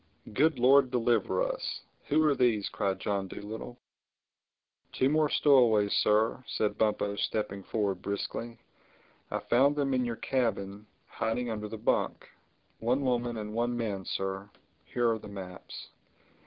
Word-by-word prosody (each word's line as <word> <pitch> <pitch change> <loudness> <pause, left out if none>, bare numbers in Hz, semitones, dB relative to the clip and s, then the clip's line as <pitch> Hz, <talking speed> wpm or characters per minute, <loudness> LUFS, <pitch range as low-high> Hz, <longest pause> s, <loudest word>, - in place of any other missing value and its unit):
"Good 150 +5 +3
Lord 130 +2 +5
deliver 120 - +1
us! - - -3 0.3
Who 155 +2 +3
are 150 - +4
these?" 120 -6 +2
cried 95 -1 -1
John 100 -2 -1
Dolittle. 110 +5 -7 1.2
"Two 130 - +2
more 155 0 +3
stowaways, 115 -10 +4
Sir," 110 +4 +2
said 105 - -1
Bumpo 105 -2 +1
stepping 100 -2 -2
forward 100 -2 -2
briskly. 115 +3 -4 0.7
"I - - -1
found 135 +5 +3
them 140 -2 0
in 130 -1 +2
your 120 -1 -2
cabin 105 -5 -2 0.2
hiding 115 +1 -2
under 105 -1 -4
the 110 - -7
bunk. 105 - 0 0.5
One 125 +5 +1
woman 120 -3 0
and 105 0 -5
one 120 +1 0
man, 105 -5 -2
Sir. 95 +1 -3 0.4
Here 120 -1 0
are 110 - -1
the - - -10
maps." 95 -3 -9
115 Hz, 140 wpm, -30 LUFS, 105-125 Hz, 1.2 s, Lord